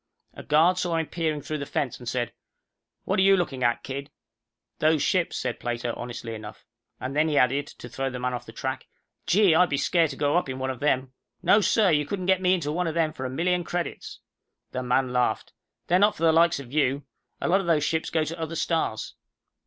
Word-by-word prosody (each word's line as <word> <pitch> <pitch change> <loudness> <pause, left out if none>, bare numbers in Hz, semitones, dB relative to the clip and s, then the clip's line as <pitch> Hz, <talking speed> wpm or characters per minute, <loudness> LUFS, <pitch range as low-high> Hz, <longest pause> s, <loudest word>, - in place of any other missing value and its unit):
A - - -9
guard 170 +5 +3
saw 175 -2 0
him 160 - 0
peering 155 -3 -2
through 155 -1 -4
the 140 - -4
fence, 130 -5 -2
and 120 -2 -5
said, 120 -2 -2 0.7
"What - - 0
are - - +5
you 195 0 +6
looking 135 -8 -2
at, 120 0 +1
kid?" 140 +1 -6 0.7
"Those 155 -1 +3
ships," 185 -3 +1
said - - -3
Plato, 120 0 -3
honestly 120 -1 -6
enough. 110 -1 -9 0.3
And 130 +2 -5
then 155 +2 +3
he 150 - 0
added, 135 +3 +2
to - - -11
throw 135 +3 -3
the 125 - -6
man 125 0 -2
off 125 - -6
the - - -8
track, - - -4 0.4
"Gee, 195 -2 +5
I'd 180 +2 +4
be 140 - 0
scared 165 +2 +2
to 135 - -6
go 145 +3 +1
up 175 - 0
in 130 - -4
one 130 0 -2
of 130 - -8
them. 130 -2 0 0.3
No, 210 - +5
sir, 210 -1 +3
you 150 -2 +2
couldn't 185 +2 -3
get 190 0 +3
me 185 0 +4
into 150 -5 -3
one 175 +2 -1
of 160 - -3
them 160 -2 +1
for 130 - -6
a - - -2
million 175 +6 0
credits." 175 0 -5 0.5
The 130 - -3
man 125 0 +1
laughed. 125 -1 0 0.3
"They're 180 +1 +3
not 205 +2 +4
for 165 - -6
the 165 - +6
likes 165 -1 +4
of 135 -2 -10
you. 140 -1 +1 0.4
A - - -2
lot 190 +3 +3
of 185 - -7
those 155 -3 +3
ships 160 +2 -1
go 160 -1 +1
to 165 +2 -5
other 160 0 -4
stars." 160 -11 -1
150 Hz, 235 wpm, -26 LUFS, 130-170 Hz, 0.7 s, you